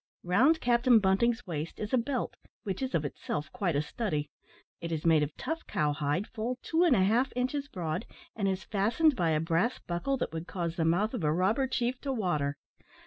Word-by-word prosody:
Round 255 - +4
Captain 240 0 +5
Bunting's 225 +4 +2
waist 160 -3 -5
is 210 +3 -4
a - - +5
belt, 250 +1 -2 0.3
which 195 +1 -3
is 260 -1 -1
of 155 - 0
itself 150 +1 -4
quite 195 -10 -1
a 145 - +1
study. 150 - -3 0.5
It 170 - -5
is 160 -1 -3
made 160 -2 +5
of 150 0 -3
tough 325 +1 -4
cow 150 -1 +1
hide, 145 +6 -1
full 235 +4 -4
two 330 +2 +2
and 330 -8 +5
a 190 - +4
half 235 +7 +2
inches 270 +3 -1
broad, 175 - -4 0.3
and 200 -3 0
is 190 -2 -1
fastened 235 - +2
by 170 -6 +1
a 155 -1 +2
brass 165 +9 +1
buckle 180 +11 -2
that 235 - -3
would 165 +2 -5
cause 170 -3 -3
the 165 -3 0
mouth 195 +8 +2
of 230 -9 -3
a 150 - +3
robber 195 - +2
chief 250 0 -1
to 280 - -2
water. 150 - -1
195 Hz, 210 wpm, -30 LUFS, 165-250 Hz, 0.5 s, Captain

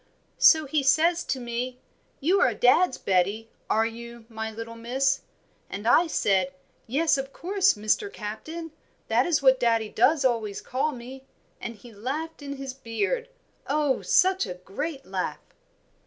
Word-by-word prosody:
"So 315 -2 +7
he 290 +1 +1
says 325 +6 +3
to 265 - -2
me, 245 +1 -4 0.4
'You 360 +8 +2
are 240 - +3
dad's 260 +8 +4
Betty, 200 +4 0 0.2
are 220 +1 +3
you, 235 0 -8
my 220 -1 -4
little 230 +1 -7
Miss?' 260 +4 0 0.5
and 205 +3 -5
I 335 +8 +5
said, 190 - +1 0.3
'Yes, 290 +4 +2
of 270 0 -5
course, 390 +5 +2
Mr. 215 - 0
Captain, 310 - -6 0.4
that - - +3
is 320 -5 +1
what 260 -1 +5
daddie 230 -3 +2
does 270 +6 +3
always 225 -5 0
call 275 +5 -1
me,' 260 +1 -10 0.3
and 230 - -5
he 230 +2 -14
laughed 290 +10 -5
in 280 -1 -5
his 270 -1 -6
beard, 400 - -2 0.4
oh! 290 -2 +1
such 375 - +3
a 180 - -5
great 270 - -5
laugh." - - -3
255 Hz, 155 wpm, -26 LUFS, 225-310 Hz, 0.5 s, So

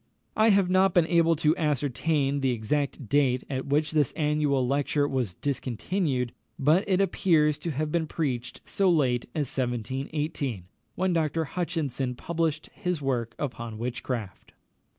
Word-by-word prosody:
I 220 +1 +5
have 195 -3 +4
not 185 0 +3
been 175 -2 +5
able 165 0 +3
to 155 0 +2
ascertain 145 -1 0
the 135 -1 +1
exact 130 +3 -1
date 130 -1 +2
at 130 +1 -3
which 150 +2 +1
this 150 -5 +2
annual 150 -4 +1
lecture 145 +2 +1
was 125 -10 -2
discontinued; 130 - -2 0.2
but 155 +6 +3
it 185 -1 +3
appears 160 -6 +2
to 170 - -4
have 150 +1 -2
been 165 -1 0
preached 130 -7 -3
so 195 -2 +2
late 130 -8 +2
as 145 -5 -2
1718, 130 - -2 0.3
when 185 0 +1
Dr. 160 0 +1
Hutchinson 145 -7 -2
published 165 +1 -2
his 180 -5 -2
work 120 -5 -2
upon 115 -5 -5
witchcraft. 120 -3 -5
145 Hz, 145 wpm, -27 LUFS, 130-165 Hz, 0.3 s, I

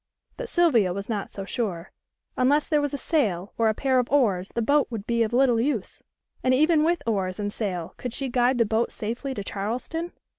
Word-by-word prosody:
But - - -6
Sylvia 245 - +3
was 200 +2 -6
not 210 -3 -2
so 195 - -7
sure. 195 -7 -3 0.4
Unless 285 +4 +2
there 300 -2 +3
was 290 -1 -1
a - - -2
sail 210 - -1
or 225 -1 +2
a 215 - 0
pair 260 0 +2
of 250 - -2
oars 205 -10 +2
the 235 - +1
boat 285 +4 +3
would 220 -4 -5
be 235 0 0
of 220 - +1
little 245 -2 +3
use, 245 -6 -2 0.4
and 255 0 +4
even 310 +2 +4
with 340 +2 +1
oars 195 -4 -1
and 205 0 -2
sail 180 -6 -3
could 250 - -5
she 270 +3 -4
guide 245 0 +2
the 230 - +3
boat 220 +2 0
safely 240 +5 -4
to 200 - -4
Charleston? 245 - -4
235 Hz, 215 wpm, -25 LUFS, 205-275 Hz, 0.4 s, and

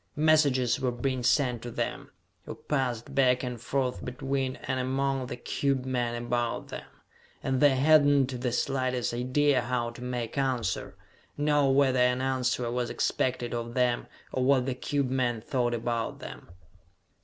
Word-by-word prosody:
Messages 145 -6 +3
were 130 -1 0
being 130 +1 -2
sent 125 -1 +2
to 120 - -6
them, - - -4 0.4
or - - -5
passed 130 -3 -2
back 130 -2 +3
and 125 -3 -4
forth 130 -1 -2
between 135 +1 -2
and 130 0 -2
among 135 0 -1
the 125 - -5
cube 135 +1 -1
men 120 -2 -1
about 120 -1 -2
them - - -7 0.6
and 130 -1 0
they 145 -2 +6
hadn't 140 -3 +4
the 125 -1 0
slightest 130 0 -1
idea 130 +3 +2
how 120 -1 -2
to 120 - -12
make 125 0 -3
answer, 125 -8 -1 0.4
know 145 -1 +3
whether 135 -1 +3
an 125 0 +3
answer 130 -2 0
was 120 -1 -1
expected 125 -1 -1
of 120 0 -4
them, 125 -1 +1 0.3
or 130 - 0
what 130 -1 +3
the 130 - -1
cube 135 +1 -2
men 125 -3 0
thought 120 0 -1
about 115 0 -2
them! - - -10
130 Hz, 155 wpm, -28 LUFS, 120-135 Hz, 0.6 s, they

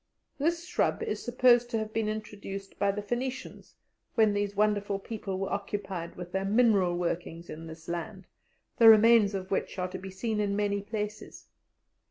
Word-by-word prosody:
This 335 +4 0
shrub 405 - 0
is 445 - -3
supposed 240 -1 +4
to 230 - -1
have 220 0 -4
been 220 -1 0
introduced 200 -2 -7
by 200 0 +3
the 205 +1 -5
Phoenicians, 250 +4 -5 0.4
when 220 -3 +4
these 205 0 -1
wonderful 205 -1 +1
people 195 -2 -5
were 195 0 -2
occupied 195 -4 -4
with 175 0 -8
their 190 +1 -1
mineral 200 -4 +3
workings 170 -1 -3
in 165 +1 -8
this 160 0 -11
land, 175 +3 -5 0.5
the 230 -1 +9
remains 220 -2 +6
of 190 -1 -5
which 195 - -1
are 180 0 -2
to - - -6
be 190 - -8
seen 210 +3 -2
in 200 -1 0
many 200 -1 0
places. 210 0 -6
205 Hz, 175 wpm, -29 LUFS, 190-225 Hz, 0.5 s, the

